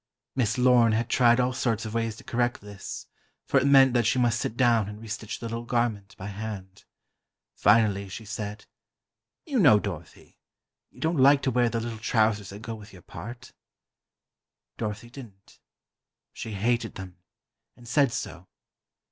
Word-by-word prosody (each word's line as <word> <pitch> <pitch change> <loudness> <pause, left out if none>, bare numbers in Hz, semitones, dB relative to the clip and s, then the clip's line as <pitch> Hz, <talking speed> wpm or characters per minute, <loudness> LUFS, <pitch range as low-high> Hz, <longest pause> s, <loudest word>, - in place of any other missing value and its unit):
Miss 115 -3 +1
Lorne 125 -3 +5
had 115 +2 0
tried 120 -1 +5
all 125 0 +1
sorts 115 -3 -1
of 110 - -6
ways 115 -1 -1
to - - -13
correct 120 0 -1
this, 100 -1 -8 0.4
for 135 - +3
it 135 - +1
meant 135 -2 +6
that 120 -3 +2
she 130 - +2
must 120 -2 +2
sit 115 - -3
down 115 -5 +3
and 105 0 -9
restitch 110 -1 -6
the - - -8
little 115 +1 -4
garment, 115 -4 -1
by 95 - -8
hand. 100 -2 -7 0.7
Finally, 105 -2 +3
she 110 +4 -8
said: 105 -1 -6 0.8
"You 280 -7 0
know, 135 - +7
Dorothy, 85 -6 -8 0.5
you - - -19
don't 160 +1 0
like 140 +1 +6
to 135 - +1
wear 120 0 +2
the 115 - -2
little 115 -1 -5
trousers 110 -3 +1
that 100 +2 -10
go 115 -1 -5
with 105 -2 -11
your 90 -3 -14
part." 115 +8 -9 1.3
Dorothy 110 +1 -4
didn't. 110 -8 -13 0.7
She 110 - -6
hated 115 +3 0
them, 95 -1 -9 0.6
and 120 - -15
said 140 +1 +3
so. 90 -4 -6
115 Hz, 165 wpm, -27 LUFS, 105-120 Hz, 1.3 s, know